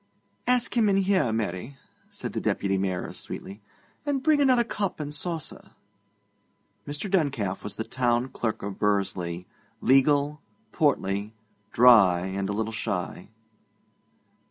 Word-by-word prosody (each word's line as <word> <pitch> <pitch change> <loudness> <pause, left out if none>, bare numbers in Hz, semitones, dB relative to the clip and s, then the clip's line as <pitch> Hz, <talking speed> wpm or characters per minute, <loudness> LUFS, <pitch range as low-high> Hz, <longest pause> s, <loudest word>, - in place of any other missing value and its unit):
'Ask 250 -1 +2
him 225 -3 +4
in 195 - +3
here, 190 - +2
Mary,' 110 +4 -3 0.3
said - - -6
the - - -2
Deputy 95 -1 0
Mayoress 95 -2 -2
sweetly; 100 +3 -7 0.4
'and 285 -3 -1
bring 310 -2 +4
another 255 -3 +4
cup 205 -6 -3
and 150 -1 -4
saucer.' 160 0 -5 1.1
Mr. 145 +7 -4
Duncalf 140 - 0
was 105 -1 -6
the 110 - -3
Town 120 +1 0
Clerk 115 -5 -3
of 100 -1 -5
Bursley: 95 -4 -1 0.3
legal, 145 +3 +3 0.3
portly, 105 - 0 0.4
dry, 110 -8 +6
and 95 +1 -3
a - - -1
little 110 +1 -2
shy. 90 -4 -4
120 Hz, 130 wpm, -26 LUFS, 100-160 Hz, 1.1 s, dry